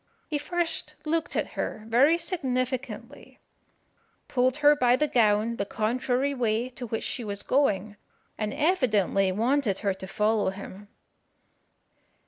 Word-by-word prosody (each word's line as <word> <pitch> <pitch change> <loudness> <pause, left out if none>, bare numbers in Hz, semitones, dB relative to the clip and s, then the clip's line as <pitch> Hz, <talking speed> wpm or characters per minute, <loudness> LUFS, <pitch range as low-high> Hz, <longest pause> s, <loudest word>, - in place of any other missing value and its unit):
He 300 -2 -2
first 340 +2 -2
looked 325 +1 -1
at - - -1
her 215 - -4
very 270 +9 +4
significantly, 260 -6 -4 0.9
pulled 255 +1 +1
her 295 0 +6
by 245 -3 +4
the 300 +4 +1
gown 225 -2 +2
the - - 0
contrary 250 +6 0
way 235 -1 0
to 250 -1 -7
which 225 0 -3
she 245 - -3
was 205 -1 -1
going, 215 -7 +1 0.4
and 215 -1 -3
evidently 215 - +2
wanted 230 0 +1
her 200 - +2
to 190 0 -9
follow 210 +1 +1
him. 200 +1 -9
245 Hz, 130 wpm, -27 LUFS, 210-280 Hz, 0.9 s, her